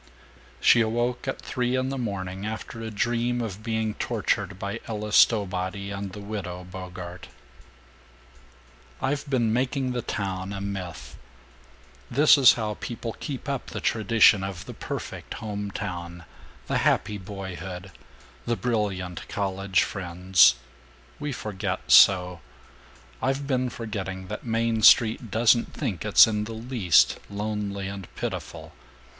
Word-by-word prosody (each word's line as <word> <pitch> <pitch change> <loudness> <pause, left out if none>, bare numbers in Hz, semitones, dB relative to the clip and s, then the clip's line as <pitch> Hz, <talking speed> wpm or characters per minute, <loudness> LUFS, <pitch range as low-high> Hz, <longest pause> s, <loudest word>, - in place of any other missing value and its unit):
She 120 - +6
awoke 120 +3 -1
at 135 - -2
three 125 0 -1
in 130 0 0
the 135 - -3
morning, 95 -4 -4
after 110 +1 -5
a 115 - -4
dream 120 +3 0
of 110 -3 -4
being 110 -1 -1
tortured 100 - -1
by 100 +1 -4
Ella 105 -1 -4
Stowbody 100 -2 +2
and 100 -1 -5
the 105 - -7
Widow 100 -4 -5
Bogart. 90 -1 -8 1.7
"I've 140 +1 -2
been 120 -5 +1
making 130 +1 0
the 125 -1 -2
town 95 -2 -3
a 100 - -4
myth. 95 -3 -6 0.9
This 145 +6 +6
is 135 -3 +7
how 105 -3 -3
people 115 -1 -5
keep 140 -3 -6
up 140 -2 -3
the - - -5
tradition 110 -2 +4
of 95 -2 -5
the - - -8
perfect - - -6
home 105 -2 -4
town, 85 -3 -6 0.4
the - - 0
happy 105 -1 +1
boyhood, 95 -1 -7 0.6
the 120 - +1
brilliant 95 -6 -2
college 95 -2 0
friends. 90 -3 +3 0.6
We 150 0 -3
forget 100 -6 -4
so. 90 -2 +6 0.8
I've 135 +1 0
been 130 -2 0
forgetting 95 -5 -5
that - - -5
Main 115 -1 0
Street 110 +1 +5
doesn't 115 +3 +3
think - - -3
it's - - +8
in 105 -1 -1
the 115 - -7
least 110 -7 +3
lonely 100 -1 -3
and 95 -3 -7
pitiful. - - -5
105 Hz, 135 wpm, -26 LUFS, 95-115 Hz, 1.7 s, it's